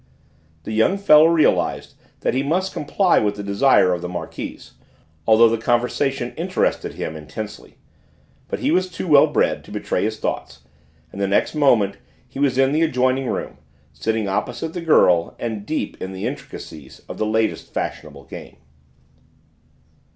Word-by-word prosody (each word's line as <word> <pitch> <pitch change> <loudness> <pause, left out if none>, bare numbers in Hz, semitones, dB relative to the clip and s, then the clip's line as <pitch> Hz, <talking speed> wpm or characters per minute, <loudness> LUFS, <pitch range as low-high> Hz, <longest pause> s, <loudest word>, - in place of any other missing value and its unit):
The - - -6
young 110 - +2
fellow 155 -5 +6
realised 165 -2 +1 0.3
that - - 0
he 130 - +1
must 175 +7 -1
comply 180 +5 +2
with 105 -1 0
the 100 - -6
desire 100 -2 +3
of 90 - -3
the 90 - -5
Marquise, 90 -1 -7 0.6
although 115 +1 +7
the 115 0 0
conversation 125 +2 0
interested 185 +3 -1
him 80 - -5
intensely; 105 +8 -8 0.7
but - - -4
he - - +1
was 185 +2 +1
too 180 +1 -6
well 145 -3 +6
bred - - 0
to - - -14
betray - - -2
his - - -2
thoughts, - - -4 0.5
and 100 - -7
the 100 - +1
next 100 - +1
moment 120 -10 +3 0.3
he 130 - -9
was 140 -3 +1
in 135 0 +3
the 155 +2 +1
adjoining 130 -3 +1
room, - - -4 0.3
sitting 110 +8 -2
opposite 120 +11 -3
the 175 - -4
girl, 90 - +3
and 110 -3 -5
deep 155 - -3
in 95 +1 -5
the 95 - -5
intricacies 75 -4 -8
of - - -8
the 110 - +1
latest 110 +1 -1
fashionable - - -5
game. - - -11
120 Hz, 160 wpm, -21 LUFS, 100-150 Hz, 0.7 s, although